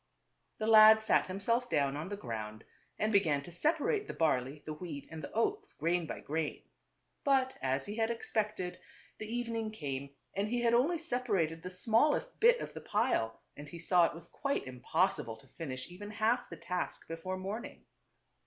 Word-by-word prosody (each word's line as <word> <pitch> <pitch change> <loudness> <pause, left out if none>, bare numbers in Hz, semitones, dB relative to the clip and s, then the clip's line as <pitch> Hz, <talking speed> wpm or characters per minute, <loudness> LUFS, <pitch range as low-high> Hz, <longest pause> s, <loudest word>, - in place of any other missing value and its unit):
The 215 - -2
lad 220 0 +8
sat 220 - +3
himself 230 +6 0
down 140 -2 +1
on 155 +5 -4
the 205 - -4
ground 110 - -6 0.3
and 215 +1 +1
began 155 -8 +3
to 175 - -10
separate 330 - +1
the - - -6
barley, 145 -2 0
the 155 - -4
wheat, 150 -3 -7
and 160 -1 -7
the - - -6
oats, 410 - -1
grain 170 0 0
by - - -5
grain. 155 +1 -3 0.6
But 265 -2 +3
as 135 +1 0
he 205 +2 -6
had 225 0 +2
expected, 215 -5 -2 0.4
the 215 - -5
evening 230 -1 -2
came 140 -9 -4 0.2
and 200 +2 0
he 240 +2 0
had 235 -1 +3
only 285 +9 +3
separated 210 - 0
the 180 - -6
smallest 230 - +2
bit 480 +2 +6
of - - -6
the - - -7
pile, 115 0 0 0.2
and 145 0 -9
he 170 - -8
saw 170 +1 +4
it - - -7
was 165 - -8
quite 280 0 -2
impossible 130 -1 0
to 135 - -19
finish 130 -5 -6
even 205 +3 -8
half 225 +3 +1
the - - -8
task 180 0 -4
before 165 +3 -4
morning. 200 +5 -6
190 Hz, 180 wpm, -33 LUFS, 155-230 Hz, 0.6 s, lad